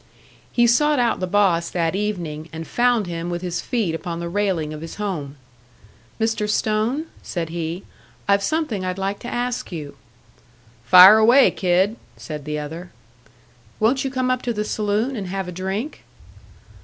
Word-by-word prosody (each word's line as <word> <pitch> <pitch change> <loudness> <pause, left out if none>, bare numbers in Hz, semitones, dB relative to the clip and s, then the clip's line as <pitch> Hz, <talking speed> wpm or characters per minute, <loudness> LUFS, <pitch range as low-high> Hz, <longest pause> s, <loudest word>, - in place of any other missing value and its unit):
He 240 - +3
sought 295 +6 +3
out 240 -2 +1
the 185 - -2
boss 180 -4 +2
that 165 -1 -1
evening, 170 -7 -3
and 160 0 -6
found 240 -1 +2
him 170 0 -4
with 175 0 -4
his 175 -1 -2
feet 225 -10 -1
upon 170 +1 -4
the 170 0 -4
railing 180 -5 -1
of 155 - -8
his 165 - -7
home. 165 -9 -4 0.8
"Mr. 220 -1 0
Stone," 220 +8 0 0.2
said 170 -3 -4
he, 170 +2 -4 0.4
"I've 200 0 +3
something 300 - -1
I'd 185 0 -3
like 195 +1 -2
to - - -8
ask 245 -2 -3
you." 150 -4 -7 0.9
"Fire 185 +7 +9
away, 240 +5 +6
kid," 190 +4 +1 0.2
said 150 -3 -7
the 150 0 -3
other. 160 +4 -6 0.9
"Won't 245 +5 +2
you 270 - -1
come 255 -1 0
up 255 -1 0
to 240 - -2
the 210 -1 -2
saloon 215 +5 -1
and 200 -5 -4
have 190 0 -4
a - - -5
drink?" 190 - -4
195 Hz, 170 wpm, -22 LUFS, 170-225 Hz, 0.9 s, Fire